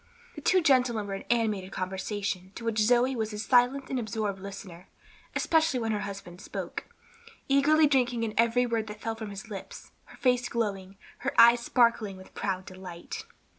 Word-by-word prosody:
The - - -9
two 370 -1 +3
gentlemen 250 -7 +3
were 200 - -5
in 195 - -6
animated 215 -5 0
conversation, 190 0 -3
to 230 - -7
which 225 -1 0
Zoe 245 +4 +3
was 220 -2 -2
a - - -5
silent 250 +4 +3
and 260 - -2
absorbed 215 -3 -3
listener, 190 -2 -9 0.5
especially 320 -5 +2
when 225 -1 -1
her 210 - 0
husband 195 -3 -7
spoke; - - -6 0.6
eagerly 295 +3 +5
drinking 250 -4 +2
in 220 -2 -2
every 235 +2 +3
word 230 -2 -1
that 210 0 -8
fell 225 - -3
from 220 -1 -7
his 205 +3 -9
lips; 195 - -8
her - - -16
face 250 -1 +2
glowing, 195 -4 -3 0.2
her 275 - -1
eyes 235 +1 +8
sparkling 235 -4 +2
with 185 - -14
proud 190 -1 -2
delight. 185 - -8
225 Hz, 175 wpm, -28 LUFS, 195-245 Hz, 0.6 s, eyes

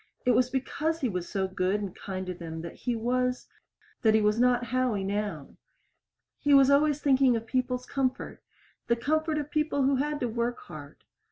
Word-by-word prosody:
It 250 - +4
was 250 +1 +3
because 315 +5 -2
he 255 - +1
was 180 -3 -4
so 190 -1 -1
good 190 +2 0
and 200 -3 -5
kind 190 -1 -5
to 180 - -4
them 165 -2 -7
that 170 - -7
he 245 -2 -3
was 250 +2 -1 0.5
that 220 -1 +4
he 220 - +4
was 210 +2 +2
not 245 0 +3
Howie 250 -5 0
now. 200 -7 -4 0.8
He 290 -1 +4
was 275 0 +6
always 295 +1 +3
thinking 265 -3 +4
of 225 0 -3
people's 250 +1 -1
comfort 260 -1 -2 0.5
the 235 - +3
comfort 310 +5 0
of 295 -1 -4
people 305 -3 +1
who 270 0 +3
had 295 +2 -1
to 245 - +1
work 235 +1 -2
hard. 145 -2 -11
245 Hz, 190 wpm, -28 LUFS, 205-275 Hz, 0.8 s, was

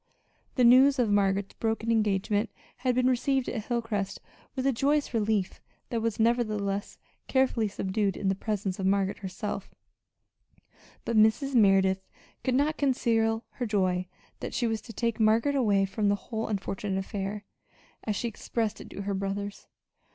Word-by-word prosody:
The 255 - +3
news 260 +4 +7
of 235 -4 +2
Margaret's 200 -1 +1
broken 225 0 -1
engagement 210 0 +1 0.3
had 250 0 0
been 250 0 +2
received 260 +1 +1
at 215 -3 -3
Hilcrest 225 -5 -2 0.4
with 260 -1 -2
a 275 - +4
joyous 285 +3 +1
relief 210 -4 0 0.3
that 230 -2 -1
was 225 -1 -1
nevertheless 215 -3 0 0.3
carefully 260 -4 +2
subdued 195 0 -1
in 195 - -2
the 190 - +3
presence 195 -1 -3
of 190 - 0
Margaret 195 0 +1
herself; 195 +1 -5 1.4
but 235 - -1
Mrs. 220 +6 +4
Merideth 195 -4 +4 0.4
could 255 -2 +1
not 295 +3 +1
conceal 225 -4 +1
her 245 - -4
joy 185 -3 +1 0.3
that - - -5
she 245 - +1
was 225 -2 -1
to 225 - -10
take 230 +1 -2
Margaret 225 +6 +3
away 205 -7 +3
from 200 +2 0
the 200 - +3
"whole 220 +2 -4
unfortunate 195 -1 -2
affair," 200 +1 -4 0.6
as 210 - -1
she 235 - -1
expressed 225 0 -3
it - - -11
to 200 - -6
her 200 0 -2
brothers. 195 +1 -4
215 Hz, 160 wpm, -28 LUFS, 200-240 Hz, 1.4 s, news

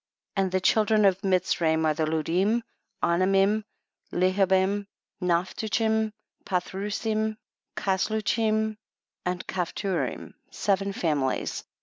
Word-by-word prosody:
21. 195 - +2
And 185 - -3
the 185 0 +1
children 215 +1 +4
of 195 -1 +3
Mitz 185 -2 +1
raim 160 -1 +2
are 155 - +3
the 155 +1 0
Ludim, 180 +9 +1 0.4
Anamim, 195 +4 +3 0.5
Leha 185 +2 +2
bim, 190 +2 +2 0.3
Naphtuchim, 220 +5 +1 0.3
Pathrusim, 210 +4 -1 0.4
Cas 190 -1 0
luchim 220 0 0 0.5
and 180 0 -2
Caphturim, 180 -4 -2 0.2
seven 195 0 0
families. 150 -8 -1
195 Hz, 105 wpm, -27 LUFS, 180-215 Hz, 0.5 s, children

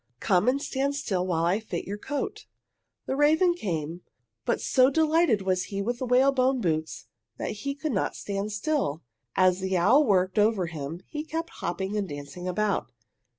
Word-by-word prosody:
"Come 185 +2 +2
and 265 +2 +3
stand 280 -1 -1
still 185 -9 -1
while 165 -2 +1
I 180 +5 +2
fit 190 -6 -5
your 205 +2 -5
coat." 290 - -4 0.6
The 265 - -1
raven 315 +5 +4
came, 170 - -4 0.4
but - - +1
so 255 0 +4
delighted 315 - +3
was 185 -1 0
he 195 - -5
with 240 +4 -2
the 255 - -3
whalebone 260 +1 +3
boots 160 -6 -2 0.3
that - - -3
he 275 +7 -4
could 300 +1 -3
not 195 - -1
stand 200 +1 -3
still. 215 - -1 0.3
As 185 -1 +4
the 190 -1 0
owl 265 - +5
worked 190 -4 +2
over 210 -3 +3
him 160 0 -6
he 300 0 -4
kept 325 +1 -4
hopping 190 +4 -3
and 200 -3 -1
dancing 145 +5 -7
about. 200 +2 -1
210 Hz, 175 wpm, -27 LUFS, 180-275 Hz, 0.6 s, owl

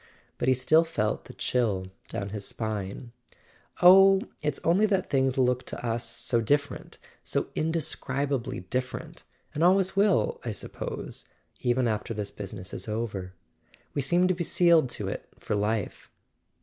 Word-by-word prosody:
But 120 - -1
he 130 - +5
still 155 +6 +4
felt 110 -10 -2
the - - -11
chill 100 -7 -1 0.2
down 100 - -4
his 100 -1 -4
spine. 110 +1 -3 0.7
"Oh, 195 +2 +8 0.2
it's 150 -2 -1
only 190 +6 +4
that 195 -3 0
things 135 -1 +2
look 125 -1 +2
to - - -6
us 115 0 -1
so 115 0 +1
different— 140 +5 -1 0.3
so - - -1
indescribably 145 - -2
different—and 130 - -5
always 190 +1 +4
will, 345 - +2
I - - -3
suppose, - - -7 0.3
even 125 -1 +1
after 110 +1 -2
this 105 -1 -4
business 95 -2 -8
is - - -5
over. 105 -4 -4 0.6
We 145 - 0
seem 175 +7 +3
to 185 - +2
be 175 -1 -3
sealed 170 -5 +4
to - - -4
it - - -5
for - - -3
life." 105 0 -2
130 Hz, 150 wpm, -27 LUFS, 110-165 Hz, 0.7 s, Oh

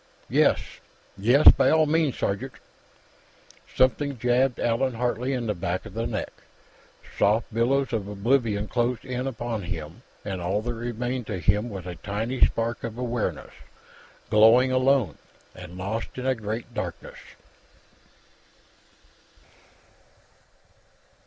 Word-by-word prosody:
"Yes, - - +3 0.5
yes; 120 +9 +7
by - - +2
all 160 0 +4
means, 155 -2 +1
sergeant." 115 +6 -2 1.2
Something 135 +2 +2
jabbed 125 +2 +1
Allan 120 +2 0
Hartley 125 +2 -1
in 125 -3 -2
the 105 - 0
back 90 +1 -3
of 110 - -10
the 115 +2 -2
neck. 110 -3 -4 0.9
Soft 105 +2 +2
billows 130 +4 +1
of 105 -3 -2
oblivion 105 0 0
closed 120 +1 -1
in 130 0 -3
upon 120 -3 -4
him, 85 +2 -6 0.2
and 95 -3 -4
all 95 +5 -1
that 120 +1 -3
remained 120 +1 -4
to 105 - -3
him 105 +7 +1
was 95 -5 -7
a 90 -2 -7
tiny 110 +8 -2
spark 115 +1 +1
of 115 -1 -5
awareness, 120 -2 -3 0.8
glowing 115 +4 +6
alone 130 - +2 0.3
and 90 0 -10
lost 100 +5 -3
in 130 - -4
a 130 - +3
great 110 0 -5
darkness. - - -6
115 Hz, 125 wpm, -25 LUFS, 105-125 Hz, 1.2 s, yes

